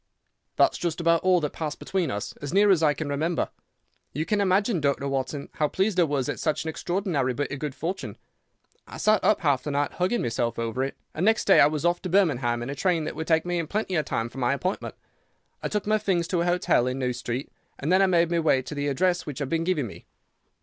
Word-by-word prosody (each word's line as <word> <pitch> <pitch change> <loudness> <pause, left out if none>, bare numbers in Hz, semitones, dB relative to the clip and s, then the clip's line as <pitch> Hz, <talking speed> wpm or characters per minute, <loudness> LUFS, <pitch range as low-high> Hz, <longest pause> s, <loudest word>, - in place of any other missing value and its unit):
"That's - - +3
just 170 -1 -2
about 170 -1 +3
all 185 -1 +4
that 150 - -2
passed 155 -3 -4
between 185 -6 -2
us, 105 -4 -4
as 145 - -6
near 200 +2 +5
as 180 -4 +4
I 150 -2 +3
can 155 - -4
remember. 155 +4 -1 0.6
You 155 +4 -2
can 210 +2 +1
imagine, 195 -1 +2
Dr. 140 -1 0
Watson, 135 +1 -3
how 150 - +1
pleased 190 +3 0
I - - +6
was 140 -4 -1
at - - -3
such 155 -2 0
an 160 - -3
extraordinary 170 - -1
bit 145 +1 -2
of 145 - -4
good 150 -2 -4
fortune. 180 +5 -4 0.7
I - - -9
sat 215 0 +3
up 210 - +3
half 140 -6 +2
the 150 - -5
night 145 0 0
hugging 185 +7 0
myself 115 0 -1
over 115 +2 -2
it, 135 - -4 0.2
and 160 - -3
next 220 +2 +3
day 195 - +6
I - - +8
was 150 +1 -2
off 175 0 +2
to 185 - -4
Birmingham 125 -11 +2
in 130 - -4
a - - -2
train 165 +2 +1
that - - -4
would 160 - -5
take 160 0 +2
me 175 -1 -1
in 165 - -3
plenty 190 -3 -1
time 115 -5 -2
for 135 - -9
my 125 +1 +2
appointment. 180 +7 -3 0.7
I - - -2
took 210 -1 -2
my 215 +1 +2
things 175 -5 0
to 175 -3 +1
a - - 0
hotel 175 -8 +2
in 130 +1 -2
New 125 -2 -1
Street, 125 +2 -4 0.3
and 150 +5 -2
then 185 +1 +5
I 195 - +5
made 170 -2 +2
my 170 - +2
way 150 -5 +2
to 150 - -7
the 145 0 -2
address 175 +5 +1
which 145 - -5
had 140 -3 -3
been 165 0 0
given 165 -6 0
me. 105 - -11
160 Hz, 250 wpm, -26 LUFS, 140-180 Hz, 0.7 s, I